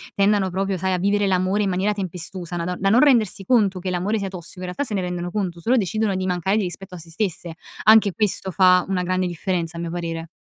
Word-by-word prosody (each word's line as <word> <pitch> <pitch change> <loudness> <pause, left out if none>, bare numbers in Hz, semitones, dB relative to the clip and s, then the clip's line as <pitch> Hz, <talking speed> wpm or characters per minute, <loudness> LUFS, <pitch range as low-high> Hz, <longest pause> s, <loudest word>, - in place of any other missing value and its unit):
tendano 200 -1 +2
proprio, 195 +1 -1
sai, 190 +1 -1
a - - +1
vivere 205 +2 +1
l'amore 190 +2 +1
in 200 - 0
maniera 190 +3 0
tempestosa 180 -2 -5
na 170 - -2
don 180 +1 -2
da 195 - +2
non 235 +5 +5
rendersi 230 -9 +3
conto 200 -5 +2
che 185 +1 -4
l'amore 190 +5 -1
sia 200 - -3
tossico, 180 -1 -9
in 185 - -5
realtà, 180 +10 -3
se 230 -6 -4
ne 190 - 0
rendono 180 -1 -4
conto, 185 -5 -3
solo 245 +8 +2
decidono 215 0 0
di 185 0 -2
mancare 180 +3 0
di 215 - +1
rispetto 185 +1 -6
a - - -7
se 165 - -12
stesse. 175 -2 -3 0.3
Anche 215 -2 +6
questo 200 -2 0
fa 180 -1 +4
una 190 -2 0
grande 185 +1 0
differenza, 170 -1 -3
a 170 - -4
mio 170 - -4
parere. 165 -1 -4
185 Hz, 250 wpm, -22 LUFS, 180-200 Hz, 0.3 s, Anche